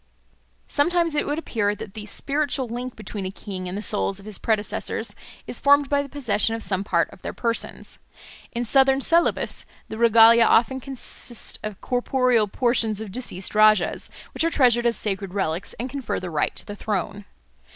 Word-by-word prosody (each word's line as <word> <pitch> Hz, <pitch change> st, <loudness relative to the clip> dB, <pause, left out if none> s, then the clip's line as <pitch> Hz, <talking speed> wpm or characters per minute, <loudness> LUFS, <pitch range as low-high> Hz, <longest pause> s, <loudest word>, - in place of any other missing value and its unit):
Sometimes 335 Hz, +2 st, +1 dB
it 300 Hz, -, 0 dB
would 295 Hz, -, -1 dB
appear 210 Hz, -10 st, -1 dB
that 195 Hz, -, -9 dB
the 210 Hz, -1 st, -8 dB
spiritual 280 Hz, 0 st, -1 dB
link 245 Hz, +2 st, -5 dB
between 215 Hz, -2 st, -6 dB
a 185 Hz, -, -3 dB
king 190 Hz, -2 st, -7 dB
and 185 Hz, -, -5 dB
the 210 Hz, -, -3 dB
souls 200 Hz, -2 st, +1 dB
of 195 Hz, -, -14 dB
his 215 Hz, -3 st, -3 dB
predecessors 215 Hz, -2 st, -1 dB, 0.3 s
is -, -, -4 dB
formed 285 Hz, 0 st, +4 dB
by 285 Hz, 0 st, +2 dB
the 280 Hz, -, -8 dB
possession 225 Hz, -6 st, 0 dB
of 225 Hz, -, -4 dB
some 190 Hz, -1 st, -1 dB
part 170 Hz, -4 st, +1 dB
of -, -, -15 dB
their -, -, -5 dB
persons. 230 Hz, -1 st, -2 dB, 0.5 s
In 240 Hz, +1 st, -2 dB
southern 270 Hz, +2 st, +4 dB
Celebes 335 Hz, +5 st, +2 dB, 0.2 s
the 220 Hz, -, -6 dB
regalia 230 Hz, 0 st, +7 dB
often 255 Hz, +4 st, +3 dB
consist 255 Hz, -2 st, -5 dB
of 215 Hz, -2 st, -7 dB
corporeal 250 Hz, -3 st, +1 dB
portions 225 Hz, -1 st, +1 dB
of 220 Hz, -3 st, -6 dB
deceased 195 Hz, -5 st, -3 dB
rajahs, 215 Hz, -3 st, +3 dB, 0.2 s
which -, -, 0 dB
are 330 Hz, -, +3 dB
treasured 240 Hz, -6 st, +3 dB
as 230 Hz, -, +2 dB
sacred 195 Hz, -2 st, -3 dB
relics 175 Hz, -2 st, -2 dB
and 245 Hz, -, -5 dB
confer 270 Hz, -1 st, -3 dB
the 180 Hz, -2 st, -6 dB
right 150 Hz, -, 0 dB
to -, -, -2 dB
the 205 Hz, -, -7 dB
throne. 205 Hz, -1 st, -3 dB
225 Hz, 180 wpm, -23 LUFS, 205-260 Hz, 0.5 s, regalia